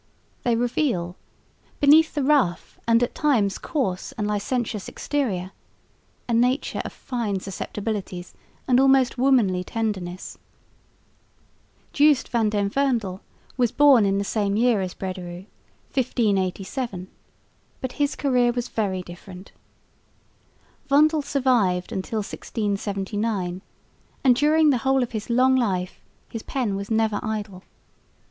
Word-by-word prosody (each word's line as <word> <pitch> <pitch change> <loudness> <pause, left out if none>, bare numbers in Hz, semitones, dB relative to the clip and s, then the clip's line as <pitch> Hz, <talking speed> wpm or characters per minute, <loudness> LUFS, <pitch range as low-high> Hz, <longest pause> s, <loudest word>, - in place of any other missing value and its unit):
They 240 -1 +1
reveal, 230 - -1 0.6
beneath 310 +3 +5
the 290 - 0
rough 265 -12 +1
and 230 +1 +4
at 245 - -1
times 235 -10 +1
coarse 195 - -2
and 210 - -3
licentious 210 0 -2
exterior, 200 -11 -2 0.8
a 240 - -1
nature 250 +4 +1
of - - -6
fine 225 -6 -3
susceptibilities 195 -1 -5 0.3
and 250 -1 +4
almost 265 -2 +4
womanly 235 -9 +3
tenderness. 190 -5 -4 1.5
Joost 290 -2 +4
van 225 -3 +1
den 205 -1 0
Vondel 225 -6 -1 0.4
was 245 -3 +2
born 285 -6 +6
in 195 0 +1
the 200 - 0
same 200 -1 -1
year 230 -2 +3
as 185 -1 -4
Brederôo, 185 -1 -6 0.5
1587, 200 -3 -1 0.7
but 260 - -4
his 285 +1 -1
career 250 -4 +2
was 245 0 -3
very 190 -4 -2
different. 180 +2 -11 1.4
Vondel 305 +2 +4
survived 245 -11 +1
till - - -4 0.3
1679, 200 -2 -3 0.6
and 255 -3 +5
during 305 +3 +4
the 255 - +1
whole 270 +1 +2
of 240 - -5
his 215 -1 -5
long 255 +2 +4
life 190 -7 -1 0.3
his 225 - -6
pen 235 -7 -2
was 200 +1 -5
never 220 -2 +1
idle. 210 -4 -4
225 Hz, 120 wpm, -24 LUFS, 195-260 Hz, 1.5 s, born